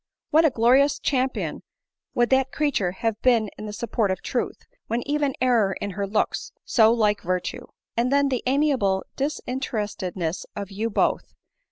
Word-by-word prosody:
What 320 +2 +5
a - - +6
glorious 260 +4 +4
champion 260 -2 -1 0.5
would 240 +1 +2
that 265 0 +3
creature 285 -12 0
have 225 +2 -2
been 230 -5 +3
in 215 - -7
the - - -5
support 220 -1 -1
of 190 - -2
truth, - - -3 0.2
when 235 +4 -2
even 290 -2 0
error 235 -6 +3
in 200 - -3
her 200 +1 -3
looks 210 +2 -1
so 220 -2 +5
like 210 -3 +2
virtue! 180 0 -3 0.3
And 240 +2 +1
then 280 0 +3
the 255 -2 -1
amiable, 260 -9 +2
disinterestedness 210 - -3
of 200 -1 -5
you 215 +4 -2
both 205 - 0
230 Hz, 160 wpm, -24 LUFS, 205-265 Hz, 0.5 s, a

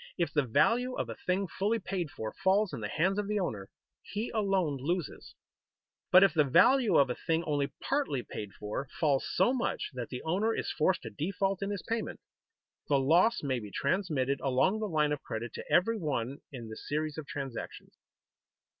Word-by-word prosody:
If 170 - 0
the 150 - +4
value 235 - +2
of - - -3
a - - -5
thing 185 +2 +2
fully 205 +6 0
paid 185 -5 -3
for 110 -5 -6
falls 195 +1 +2
in - - -4
the 105 - -3
hands 185 - +1
of 205 - -2
the 210 0 0
owner, 105 - -3 0.3
he 215 +3 -4
alone 195 - +1
loses; 165 +4 -3 0.8
but 185 +1 +9
if 195 -4 +4
the 155 -3 +4
value 200 - +5
of 135 -3 +4
a - - -4
thing 165 0 +2
only 145 -3 -1
partly 270 - 0
paid 105 - -6
for 105 +6 -4
falls 145 -4 +2
so 190 +8 +3
much 250 -3 -2
that 125 -2 -5
the 125 - -6
owner 200 +8 +1
is - - -2
forced 180 +4 +1
to - - -6
default 195 +4 -1
in 200 - -1
his 200 -2 -4
payment, 230 0 -2 0.7
the 140 - +3
loss 170 - +3
may 130 -3 0
be 105 -2 -8
transmitted 140 - 0
along 140 +11 +2
the 215 - -1
line 150 -3 +2
of 150 - -2
credit 115 0 -5
to - - -8
every 225 +5 +3
one 140 - -2
in 120 -5 -7
the 110 - -7
series 155 +1 -3
of 150 - -8
transactions. 135 -5 -6
165 Hz, 195 wpm, -31 LUFS, 135-195 Hz, 0.8 s, but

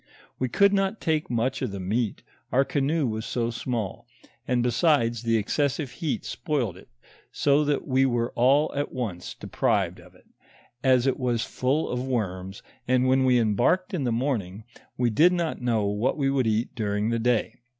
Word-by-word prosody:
"We 130 - 0
could 200 +9 +4
not 195 +2 0
take 155 -2 -1
much 125 +2 -1
of 130 - -1
the 100 0 -6
meat, 105 +4 -2 0.3
our 135 +2 +3
canoe 145 +2 0
was 110 -2 -2
so 115 0 -2
small, 120 -2 -4 0.4
and 125 -1 +1
besides 120 -2 +2
the 115 -1 +1
excesbive 140 +5 -1
heat 160 -6 -3
spoiled 135 - -2
it, 95 - -15 0.4
so 145 +1 +2
that 145 -1 -1
we 135 0 +3
were 120 -2 0
all 140 +6 +3
at 145 +1 -2
once 105 -9 -5
deprived - - -1
of - - -17
it, - - -22 0.6
as 130 -2 +4
it 135 - +1
was 120 -3 0
full 135 +5 0
of 125 - -2
worms; 95 -6 -3 0.2
and 130 0 +3
when 130 0 +3
we 125 -1 +4
embarked 120 - +1
in 165 -7 -1
the 120 - 0
morning, 115 -6 -2 0.3
we 120 -2 +1
did 170 +11 +5
not 170 -6 -2
know 115 -4 +1
what 105 +7 0
we 135 -2 +1
would 130 -4 +1
eat 110 +2 0
during 105 0 -1
the 115 - 0
day. 115 -1 0
125 Hz, 180 wpm, -26 LUFS, 115-140 Hz, 0.6 s, did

